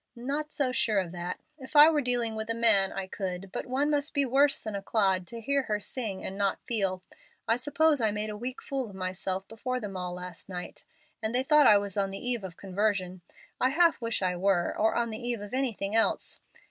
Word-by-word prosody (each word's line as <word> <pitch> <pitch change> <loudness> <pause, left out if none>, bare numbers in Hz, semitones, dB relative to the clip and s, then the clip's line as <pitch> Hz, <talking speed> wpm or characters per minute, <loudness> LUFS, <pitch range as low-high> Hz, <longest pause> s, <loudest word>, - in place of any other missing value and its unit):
Not 285 +5 -3
so 270 -3 0
sure 225 -4 +1
of 180 -3 -3
that. 175 0 -5 0.2
If 260 +3 -11
I 295 +1 +10
were 300 -2 +1
dealing 245 -3 0
with 220 0 -5
a 230 - 0
man 215 -5 +4
I 195 - -4
could, 190 -1 -5
but - - -4
one 275 +4 0
must 290 +1 0
be 280 -1 +3
worse 275 +2 +3
than 215 -2 -5
a 200 - -3
clod 190 -4 +1
to 235 - -7
hear 280 +5 +1
her 210 -5 -2
sing 210 -3 -4
and 190 - -4
not 200 -1 +1
feel. 195 -5 0 0.4
I 230 - +4
suppose 290 +2 +2
I 220 - +3
made 210 +1 -3
a - - -6
weak 250 +4 -6
fool 265 -4 -3
of 195 - -12
myself 185 +1 -2
before 255 +3 -4
them 205 -4 -6
all 180 -1 -4
last 180 +1 -8
night, 180 -1 -7 0.4
and 220 +2 -2
they 255 - +2
thought 300 0 +5
I 210 - +8
was 200 0 -2
on 195 -1 +1
the 195 - -5
eve 245 -2 -1
of 180 -3 -8
conversion. 190 -2 -1 0.4
I 255 - +3
half 330 +1 +3
wish 230 -3 -1
I 180 -1 +1
were, 180 -1 +1
or 220 +1 +1
on 235 -1 0
the 220 - -5
eve 240 -1 -2
of 205 +2 -9
anything 225 -6 -1
else. 225 - +2
220 Hz, 235 wpm, -28 LUFS, 195-255 Hz, 0.4 s, I